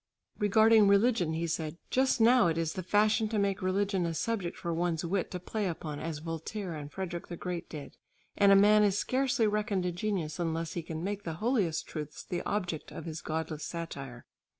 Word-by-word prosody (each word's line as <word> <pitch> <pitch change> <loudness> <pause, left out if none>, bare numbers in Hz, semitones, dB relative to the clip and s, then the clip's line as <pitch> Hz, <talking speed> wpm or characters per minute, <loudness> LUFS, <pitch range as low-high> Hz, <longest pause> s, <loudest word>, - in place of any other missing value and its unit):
Regarding 215 +1 +5
religion 200 -4 +3
he 165 +1 -1
said, 160 -1 -3
"Just 260 0 +2
now 235 -2 +6
it 165 -1 0
is 165 -1 -1
the 185 - -4
fashion 215 +4 +2
to 220 - -1
make 200 0 0
religion 190 0 +1
a 165 - -3
subject 200 -3 -2
for 170 - -3
one's 170 0 -1
wit 185 +1 -1
to 180 - -5
play 205 +3 -2
upon 155 -4 -4
as 160 -2 -4
Voltaire 165 +4 -5
and 145 -2 -7
Frederick 175 -1 -5
the 175 - -6
Great 180 -1 -5
did, 150 -3 -8 0.4
and 200 -1 +5
a - - +8
man 210 +2 +6
is 200 -2 +3
scarcely 255 -1 +1
reckoned 210 -3 0
a 180 - 0
genius 175 -4 -2
unless 165 -1 -2
he 170 - -3
can 160 0 -6
make 205 +1 -2
the 165 -4 -4
holiest 205 -5 0
truths 150 -2 -7
the 175 -1 -3
object 180 -6 -2
of - - -7
his 160 -1 -5
godless 160 -1 -3
satire...." 140 -8 -6
180 Hz, 200 wpm, -30 LUFS, 165-210 Hz, 0.4 s, a